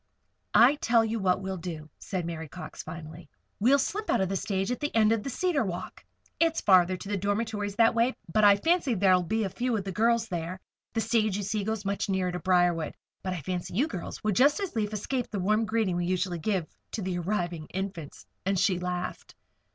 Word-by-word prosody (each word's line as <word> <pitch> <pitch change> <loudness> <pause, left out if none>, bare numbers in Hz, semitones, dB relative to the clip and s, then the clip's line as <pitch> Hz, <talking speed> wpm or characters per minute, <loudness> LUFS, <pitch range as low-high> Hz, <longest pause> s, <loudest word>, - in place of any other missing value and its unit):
"I 265 +5 +7
tell 230 -4 +3
you 225 +1 -2
what 190 -1 +1
we 190 - -3
will 190 - -3
do," 165 -3 -6
said 185 -4 -3
Mary 165 -1 -5
Cox, 155 0 -8
finally. 160 -1 -9 0.3
"We'll 255 +7 +5
slip 410 +10 -2
out - - +3
of 190 -1 +1
the 195 - -1
stage 195 +2 -1
at 250 - -2
the 295 -4 -3
end 220 -1 +5
of 225 -2 +1
Cedar 345 -1 +1
Walk. 180 -4 -6 0.4
It's 330 -1 +3
farther 185 -1 +4
to 195 - -9
the 205 0 -1
dormitories 205 +1 -2
that 225 +1 +5
way, 235 +3 +2 0.2
but 215 - +3
I 205 -1 +8
fancy 305 - +1
there'll 185 -2 +4
be 215 +4 0
few 240 +3 -1
of 200 - -3
the 195 - -4
girls 230 +3 +2
there. 175 -1 -4 0.3
The 225 - 0
stage, 220 -3 +1
you 205 - -3
see, 205 +1 -1
goes 220 0 -3
much 200 +1 -1
nearer 190 -1 0
to 180 - -4
Briarwood; 175 -2 +2 0.3
but 185 - -2
I 175 - -4
fancy 180 +3 -4
you 270 +9 +2
girls 180 - -6
would 215 -2 +1
just 285 - +4
as 395 -8 -4
lief 210 -2 0
escape 245 +4 -2
the 210 - -4
warm 215 +4 +2
greeting 220 -4 0
we 175 - 0
usually 180 -1 -1
give 185 0 0 0.3
to 215 - -3
the 180 -1 -2
arriving 175 -3 -2
Infants," 185 -5 -6 0.2
and 195 +1 0
she 185 0 +2
laughed. 180 0 -4
200 Hz, 220 wpm, -28 LUFS, 180-225 Hz, 0.4 s, I